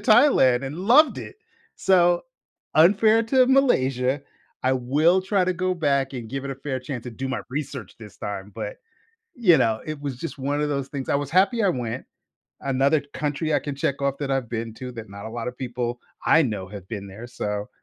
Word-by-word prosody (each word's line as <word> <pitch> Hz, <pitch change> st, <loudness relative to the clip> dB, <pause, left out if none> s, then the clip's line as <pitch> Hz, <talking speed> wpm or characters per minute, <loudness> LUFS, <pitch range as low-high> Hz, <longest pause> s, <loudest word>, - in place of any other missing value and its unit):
Thailand 215 Hz, -, +5 dB
and 140 Hz, +5 st, -5 dB
loved 245 Hz, -, +5 dB
it. -, -, -8 dB, 0.4 s
So, 175 Hz, -2 st, +3 dB, 0.5 s
unfair 210 Hz, +7 st, +5 dB
to 255 Hz, +2 st, +4 dB
Malaysia, 135 Hz, -, +2 dB, 0.4 s
I 130 Hz, -, +2 dB
will 150 Hz, +9 st, +3 dB
try 190 Hz, 0 st, +1 dB
to 185 Hz, -, +1 dB
go 185 Hz, +1 st, -1 dB
back 140 Hz, -4 st, +1 dB
and 120 Hz, -3 st, -6 dB
give 135 Hz, +3 st, -4 dB
it 140 Hz, -, -4 dB
a 130 Hz, -, -10 dB
fair 135 Hz, -1 st, -3 dB
chance, 125 Hz, -2 st, -6 dB
and 115 Hz, -, -8 dB
do 135 Hz, 0 st, -3 dB
my 130 Hz, -, -2 dB
research 140 Hz, -6 st, -5 dB
this 105 Hz, -3 st, -12 dB
time, 100 Hz, 0 st, -6 dB
but, -, -, -5 dB, 0.6 s
you 185 Hz, -10 st, +5 dB
know, 110 Hz, -1 st, +1 dB
it 155 Hz, -2 st, -5 dB
was 140 Hz, -4 st, -4 dB
just 165 Hz, +1 st, -6 dB
one 140 Hz, +2 st, -1 dB
of 150 Hz, -, 0 dB
those 140 Hz, -2 st, -2 dB
things. 140 Hz, -3 st, -5 dB
I -, -, +3 dB
was 140 Hz, -1 st, -2 dB
happy 200 Hz, +6 st, +3 dB
I 200 Hz, -, +4 dB
went. 125 Hz, -5 st, -3 dB, 0.6 s
Another 140 Hz, +3 st, +2 dB
country 150 Hz, +1 st, -1 dB
I -, -, +4 dB
can 145 Hz, -2 st, -5 dB
check 140 Hz, 0 st, -1 dB
off 140 Hz, 0 st, 0 dB
that 140 Hz, -2 st, -3 dB
I've 135 Hz, -4 st, -1 dB
been 115 Hz, -1 st, -4 dB
to 125 Hz, +2 st, -7 dB
that 110 Hz, -3 st, -9 dB
not 100 Hz, +1 st, -8 dB
a 110 Hz, -, -6 dB
lotta 120 Hz, +1 st, -4 dB
people 120 Hz, -1 st, -4 dB, 0.3 s
I 160 Hz, -, +6 dB
know 105 Hz, -7 st, -2 dB
have 100 Hz, -2 st, -10 dB
been 100 Hz, -3 st, -5 dB
there. 105 Hz, +5 st, -9 dB
So, 105 Hz, -4 st, -4 dB
135 Hz, 210 wpm, -24 LUFS, 120-170 Hz, 0.6 s, I